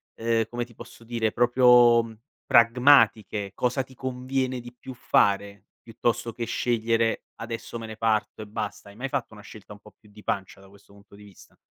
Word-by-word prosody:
ehm, 115 0 0
come 120 0 -3
ti 120 - -19
posso 115 - -13
dire, 115 -2 -1
proprio, 120 -1 +5
uhm, 115 -1 -5 0.3
pragmatiche? 115 -4 +4
Cosa 125 +2 0
ti 130 - -18
conviene 130 0 -3
di 120 0 -12
più 130 +1 -9
fare, 100 -3 +1 0.2
piuttosto 115 0 -2
che 120 - -4
scegliere: 115 -1 0
"Adesso 115 +1 -7
me 115 - -7
ne 110 - -9
parto 110 -1 -1
e 105 - -8
basta." 105 -1 -6
Hai 100 - -15
mai 130 +4 -5
fatto 135 -6 -3
una 105 - -12
scelta 105 -1 -12
un 105 - -15
po' 105 - -18
più 105 - -22
di 105 0 -16
pancia, 95 0 -4
da 95 - -17
questo 100 0 -21
punto 100 0 -20
di 105 - -15
vista? 100 -2 -18
115 Hz, 195 wpm, -25 LUFS, 105-120 Hz, 0.3 s, proprio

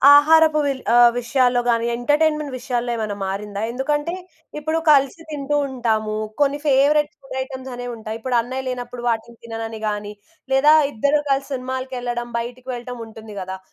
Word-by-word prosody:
ఆహారపు 310 +1 +6
విల్ 275 -2 -1
ఆహ్, 240 0 +8
విషయాల్లో 245 0 +2
గానీ, 230 -1 +2
ఎంటర్‌టైన్‌మెంట్ 300 +3 +1
విషయాల్లో 245 -1 -2
ఏమన్నా 215 -3 -3
మారిందా? 200 +1 -4
ఎందుకంటే, 295 +6 -1 0.5
ఇప్పుడు 315 +2 -1
కలిసి 275 +2 +4
తింటూ 295 -1 -2
ఉంటాము, 220 -4 -1 0.3
కొన్ని 285 0 +3
ఫేవరెట్ 290 +2 +4
ఫుడ్ 270 -1 -7
ఐటెమ్స్ 260 0 -7
అనేవుంటాయి, 230 -3 -6
ఇప్పుడన్నయ్య 255 +2 -1
లేనప్పుడు, 245 -1 -5
వాటిని 230 +1 -3
తిననని 225 -1 -5
గానీ, 210 0 -3 0.4
లేదా 290 +3 +6 0.2
ఇద్దరు 285 +6 +2
కలిసి 275 +1 0
సినిమాలకెళ్ళడం, 255 -2 -4
బయటకి 245 +2 -7
వెళ్ళటం 245 0 -6
ఉంటుంది 220 -1 -11
గదా! 190 +1 -5
250 Hz, 140 wpm, -21 LUFS, 230-280 Hz, 0.5 s, ఆహ్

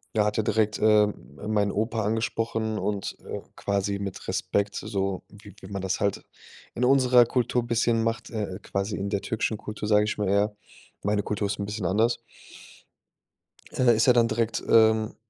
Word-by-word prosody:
er 105 - +3
hat 105 - -1
ja 110 - +2
direkt, 105 0 +1
äh, 105 -1 +5
meinen 105 0 -2
Opa 110 +2 -1
angesprochen 110 0 -1
und, 100 -2 -3
äh, - - -5 0.2
quasi 100 0 -1
mit 100 -2 -6
Respekt, 100 +1 -1
so 95 -1 -2
wie 105 -1 -15
wie - - -11
man 100 - -3
das 95 0 -1
halt 100 -1 -1 0.5
in 120 - -2
unserer 125 -2 +5
Kultur 125 0 0
bisschen 115 -1 +1
macht, 115 0 -2
äh, 105 -4 -4
quasi 100 +2 -3
in 100 +1 -3
der 100 0 -1
türkischen 110 -1 -2
Kultur, 105 0 -6
sage 105 0 +4
ich 105 - -3
mal 100 - 0
eher, 100 +2 +2 0.5
meine 105 0 +1
Kultur 105 -1 -2
ist 100 - -3
'n 100 - -2
bisschen 105 -2 -3
anders 115 +6 +2 1.6
äh, 120 -2 +5
ist 110 +3 +2
ja 125 - +7
dann 120 -1 +4
direkt, 115 -1 -1
ähm, 110 -1 +4
105 Hz, 180 wpm, -26 LUFS, 100-115 Hz, 1.6 s, ja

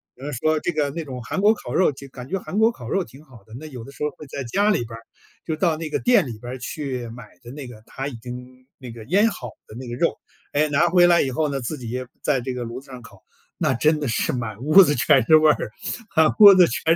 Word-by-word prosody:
比 - - -19
方 145 - -4
说 155 +5 0
这 175 - -2
个 150 -3 -1
那 165 +2 -5
种 130 -3 -7
韩 190 - -3
国 210 +2 +5
烤 - - -8
肉 185 - +4
就 140 0 -11
感 125 -1 -10
觉 195 +2 -2
韩 205 - -4
国 225 +1 +4
烤 125 - -11
肉 195 - 0
挺 140 +1 -15
好 120 -8 -17
的。 110 - -16
那 155 - -10
有 125 -5 -9
的 135 - -11
时 140 - -7
候 150 - +1
儿 - - -14
会 150 - -11
在 140 0 -6
家 200 - +1
里 120 - 0
边 115 - -11
儿 115 - -11 0.4
就 160 - -2
到 165 0 +1
那 160 -1 -5
个 - - -1
店 245 - +3
里 115 -3 -7
边 120 +2 -7
儿 130 - -7
去 125 -2 -5
买 115 -2 -11
的 120 - -11
那 140 -1 -8
个， 110 -3 -12
它 135 +1 -5
已 140 - -6
经 125 +2 -10
那 125 -3 -9
个 115 -1 -10
腌 195 - +3
好 125 - -7 0.2
的 - - -13
那 125 +1 -8
个 120 - -5
肉， 165 +6 0 0.4
诶， 150 +1 +2
拿 145 +4 +3
回 175 0 +5
来 170 -1 +5
以 135 - -2
后 155 +3 0
呢， 140 -1 -2
自 150 +6 -4
己 125 +1 -5 0.2
在 145 -3 +1
这 130 +1 -4
个 125 -1 -4
炉 120 +2 -6
子 135 - -19
上 125 -1 -9
烤， 115 - -16 0.3
那 - - +1
真 155 +5 +2
的 145 - -3
是 110 - 0
满 115 -4 -5
屋 155 +8 +7
子 150 - +1
全 130 0 +4
是 155 - +6
味 155 0 +4
儿， 110 - -3 0.5
满 160 -1 +4
屋 200 -2 +11
子 185 -2 +6
全 - - -4
140 Hz, 310 characters per minute, -22 LUFS, 125-155 Hz, 0.5 s, 屋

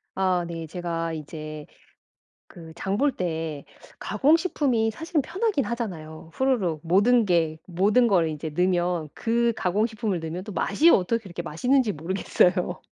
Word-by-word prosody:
아 185 -2 +1
네. 165 -1 -6
제가 165 -1 -3
이제 155 -1 -7 0.8
그 165 -2 -12
장 195 +3 -2
볼 285 +3 +2
때 160 -4 -3 0.4
가공식품이 285 -7 +2
사실은 320 - -1
편하긴 385 - -1
하잖아요. 165 -10 -6
후루룩. 200 - 0
모든 205 +7 +4
게 165 -4 +1
모든 205 +7 +3
거를 180 -6 +3
이제 155 +1 -5
넣으면 175 0 0
그 235 0 +1
가공식품을 210 0 -1
넣으면 165 +3 -5
또 210 - -8
맛이 200 - +3
어떻게 230 - +2
그렇게 175 -3 -6
맛있는지 245 - +1
모르겠어요. 180 +2 0
185 Hz, 310 characters per minute, -25 LUFS, 165-230 Hz, 0.8 s, 모든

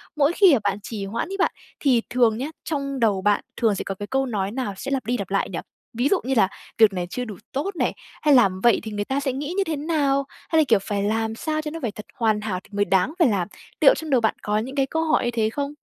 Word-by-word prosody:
mỗi 300 +3 +3
khi 380 -6 +6
mà 250 - +4
bạn 200 0 0
trì 210 -4 -5
hoãn 230 - -3
ấy 390 - -4
bạn, 380 - +2 0.3
thì 255 -5 +3
thường 235 -3 +3
nhá 265 - -3 0.2
trong 275 -3 -3
đầu 205 -5 +2
bạn 205 +1 +2 0.2
thường 220 -3 +2
sẽ - - -3
có 195 - -4
cái 205 +1 -6
câu 270 0 0
nói 205 -5 -2
nào 245 -5 -3
sẽ 275 +5 -5
lặp 270 -4 -1
đi 245 +1 0
lặp 200 -3 -5
lại 195 - 0
nhỉ? 170 - -4 0.3
Ví 245 +4 +1
dụ 395 - +3
như 265 +2 -1
là 195 -4 +5 0.3
"Việc 220 -3 +6
này 175 -1 -3
chưa 250 +4 -3
đủ 215 -4 -7 0.2
tốt" 360 +9 -2
này, - - 0 0.3
hay 295 -2 +4
"Làm 195 -7 +4
vậy 235 -1 +5
thì 220 - -6
người 205 0 -2
ta 270 +1 -1
sẽ 270 -2 -1
nghĩ 290 +5 -4
như 395 - +3
thế 325 -4 -2
nào?" 285 -2 +1 0.2
Hay 320 - +3
là, - - +5
kiểu 220 -4 +4
"Phải 200 0 -2
làm 220 +1 0
sao 310 +4 -2
cho 300 -1 -5
nó 330 - -6
phải 230 -4 -2
thật 210 0 -10
hoàn 215 -3 +1
hảo 195 -4 -2
thì - - -21
mới 205 0 +1
đáng 195 - +2
phải 330 - +6
làm"? 195 -6 0 0.3
Liệu - - +7
trong 320 -1 -6
đầu 255 -4 +3
bạn 220 - +1
có 210 0 0
những 255 +5 -3
cái 275 -2 +2
câu 320 +4 -1
hỏi 315 - +2
như 240 - 0
thế 220 -2 +1
không? 285 +4 -3
240 Hz, 290 wpm, -23 LUFS, 205-280 Hz, 0.3 s, Liệu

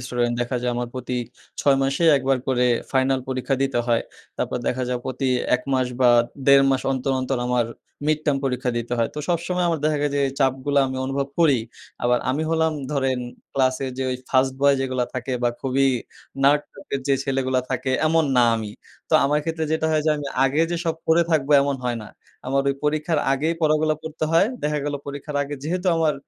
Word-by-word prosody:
Student. 120 -1 -1
দেখা 120 +1 -1
যায়, 125 0 0
আমার 120 0 -2
প্রতি 125 0 -4 0.4
৬ 140 -1 +4
মাসে 135 +5 0
একবার 135 -1 +1
করে 125 -1 +2 0.3
ফাইনাল 130 0 +2
পরীক্ষা 130 +1 -1
দিতে 135 -3 0
হয়। 115 -1 +2 0.3
তারপর - - -2
দেখা 130 +1 0
যায়, 125 -1 -1
প্রতি 130 0 -2 0.3
১ 125 - -12
মাস 130 -1 +2
বা, 125 -1 +6 0.4
১.৫ 140 0 +7
মাস 130 -1 +1
অন্তর, 135 +1 -1
অন্তর 130 0 -1
আমার 125 -2 +1 0.4
mid 155 0 +2
term 145 -2 +3
পরীক্ষা 125 -1 -1
দিতে 120 +1 -5
হয়। 115 - +2
তো - - -5
সবসময় 175 +1 0
আমার 165 -2 0
দেখা 155 0 +2 0.2
যায়, 140 0 +1
এই - - -6
চাপগুলো 135 +1 +1
আমি 130 0 -4
অনুভব 135 +1 -2
করি। 145 -6 +5 0.4
আবার 120 0 +3
আমি 145 +4 -1
হলাম 160 -1 +2 0.2
ধরেন, 135 -3 0 0.3
ক্লাসের 130 0 0
যে - - 0
ওই 125 - -1
ফার্স্ট 130 0 +3
বয় 140 0 +5
যেগুলো 130 -2 -1
থাকে 130 +1 -3
বা, 120 - +3
খুবই 135 +1 +1 0.6
nerd 145 +2 +5
টাইপের 165 -8 -5
যে 140 - +4
ছেলেগুলো 130 -1 0
থাকে, 130 0 -1 0.2
এমন 160 0 +3
না 125 - +6
আমি। 110 -2 -5 0.4
তো - - -8
আমার 145 +2 +2
ক্ষেত্রে 160 0 -2
যেটা 160 0 +1
হয় 155 -1 +2
যে, - - +4
আমি 145 -1 -5 0.2
আগে 135 +4 +1
যে 175 - 0
সব 165 -1 0
পড়ে 165 +1 +4
থাকবো, 150 -3 +1
এমন 140 -1 -1
হয় 120 -1 0
না। 105 - -10 0.4
আমার 135 +1 +1
ওই 140 - +1
পরীক্ষার 155 +2 +1
আগেই 155 +5 0
পড়াগুলো 155 0 +3
পড়তে 160 0 -4
হয়। 165 +4 +5 0.2
দেখা 150 0 0
গেলো 145 0 -2
পরীক্ষার 145 +1 -5
আগে 145 +1 -5
যেহেতু 180 +5 -2
আমার 160 -2 +2
135 Hz, 205 wpm, -23 LUFS, 130-150 Hz, 0.6 s, ১.৫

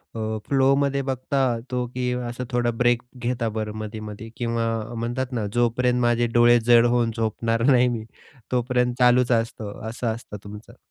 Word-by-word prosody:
अ, 110 0 -2
फ्लोमध्ये 140 0 +2
बघता 130 +1 -1 0.3
तो 125 -1 -1
की 125 0 -1 0.2
असं 125 +1 -5
थोडा 120 -1 +1
ब्रेक 120 -1 +3 0.2
घेता 120 -1 -1
बरं 105 -1 -3
मधे-मधे 110 0 -7
किंवा 115 -1 -1 0.3
म्हणतात 120 +3 -3
ना 115 -4 -1
जोपर्यंत 120 +1 +2
माझे 120 0 +2
डोळे 120 0 +6
जड 120 0 +6
होऊन 120 -1 +2
झोपणार 115 +1 -1
नाही 125 -1 +5
मी 115 -3 -2 0.5
तोपर्यंत 125 0 +1
चालूच 125 0 +4
असतं, 115 -3 -2
असं 120 +1 -4
असतं 115 -3 -9
तुमचं? 105 +1 -11
120 Hz, 155 wpm, -24 LUFS, 115-125 Hz, 0.5 s, डोळे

